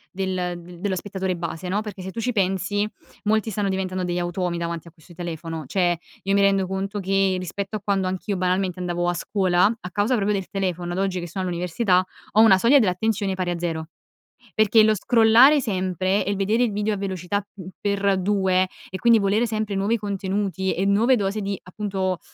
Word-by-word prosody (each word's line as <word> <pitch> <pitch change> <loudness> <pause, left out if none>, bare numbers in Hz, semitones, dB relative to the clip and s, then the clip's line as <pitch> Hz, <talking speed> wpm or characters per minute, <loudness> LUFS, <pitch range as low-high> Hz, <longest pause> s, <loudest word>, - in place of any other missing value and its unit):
del 185 -2 -2 0.3
dello 195 -1 -1
spettatore 190 -1 -3
base, 170 +1 -5
no, 205 +3 0
perché 205 -3 -8
se 190 - -6
tu 230 - -6
ci 250 +2 0
pensi 195 +1 0 0.4
molti 220 +1 +1
stanno 205 -1 -1
diventando 185 -1 -2
degli 175 0 -1
automi 175 0 -2
davanti 170 -1 -4
a - - -12
questo 165 +2 -18
telefono. 165 -2 -5
Cioè, 175 +3 +1 0.3
io 195 +1 0
mi 200 - +4
rendo 195 -1 +3
conto 195 +2 -3
che 195 0 +1
rispetto 195 +4 -4
a - - -12
quando 195 -2 0
anch'io 190 +1 -3
banalmente 185 0 0
andavo 175 0 -1
a 175 - -1
scuola, 185 -3 +2
a 180 - -8
causa 205 +6 +1
proprio 210 -2 +1
del 190 - -5
telefono, 180 -3 -2
ad 185 - -2
oggi 190 -2 0
che 175 - -5
sono 190 +3 -4
all'università, 180 +2 +1 0.3
ho 215 - +6
una 195 -4 +7
soglia 255 +7 +6
dell'attenzione 205 -2 +1
pari 185 -1 -2
a 175 - -1
zero. 165 -2 -3 0.7
Perché 215 +1 +5
lo 215 0 +4
scrollare 235 +7 +6
sempre 190 -3 0
e - - -3
il 200 - 0
vedere 210 +4 +1
il 230 - +1
video 210 +1 -1
a - - -3
velocità, 195 +1 -2
mhmm, 185 -3 -9
x2 195 -2 +1 0.2
e 190 - -5
quindi 235 -1 +5
volere 205 +4 +2
sempre 215 -2 -2
nuovi 205 +4 +1
contenuti 195 -2 -2
e 190 - -1
nuove 220 +6 +4
dosi 205 0 -1
di 200 -1 -3
appunto, 190 -1 -3
190 Hz, 200 wpm, -23 LUFS, 180-205 Hz, 0.7 s, una